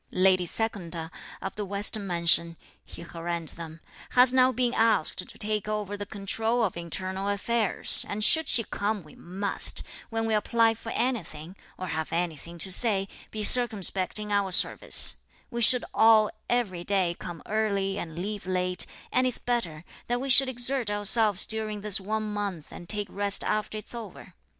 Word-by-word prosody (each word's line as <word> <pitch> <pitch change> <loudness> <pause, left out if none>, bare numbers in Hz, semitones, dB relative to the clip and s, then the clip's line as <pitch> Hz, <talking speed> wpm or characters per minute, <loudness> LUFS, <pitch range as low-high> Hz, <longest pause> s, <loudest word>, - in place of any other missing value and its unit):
"Lady 185 -1 +2
Secunda, 170 -6 -4 0.3
of 195 - -5
the 210 - -4
western 200 +1 0
mansion," 170 -1 +2 0.3
he - - -12
harangued 170 -1 -5
them, 165 -1 -10 0.3
"has 250 0 +5
now 255 0 +4
been 250 -1 -1
asked 225 -8 +3
to - - -6
take 210 -1 -2
over 210 -1 -3
the 205 0 -7
control 220 +4 -1
of 205 - -1
internal 185 +3 -5
affairs; 215 +1 0
and 210 +1 -3
should 320 +8 +5
she 230 - +6
come 205 -2 -3
we 155 - -17
must, 195 +3 -1 0.3
when 225 0 -3
we 225 - -1
apply 225 +1 +2
for 225 0 -10
anything, 185 -9 -4 0.2
or 185 - -6
have 160 -3 -4
anything 170 0 -4
to 190 +3 -2
say, 195 -1 +1 0.2
be 215 -1 -4
circumspect 210 -6 +4
in 210 0 -3
our 200 -2 0
service; 180 - +4 0.3
we 235 0 -4
should 250 +2 +6
all 220 -1 +4 0.2
every 200 -8 -1
day 185 -3 0
come 175 -2 -8
early 200 -2 -1
and 160 -1 -8
leave 200 +1 -5
late; 180 -1 0 0.2
and 255 0 +2
it's 250 - -3
better 175 -10 -3 0.2
that 245 0 -1
we 270 +1 -1
should 265 +1 +6
exert 245 -1 0
ourselves 205 -1 +3
during 215 -1 -3
this 205 -1 +3
one 215 +3 -3
month 200 -7 -5
and 175 - -12
take 210 -1 0
rest 200 0 0
after 215 0 -2
it's 215 - -10
over. 225 -6 -10
205 Hz, 170 wpm, -26 LUFS, 180-225 Hz, 0.3 s, she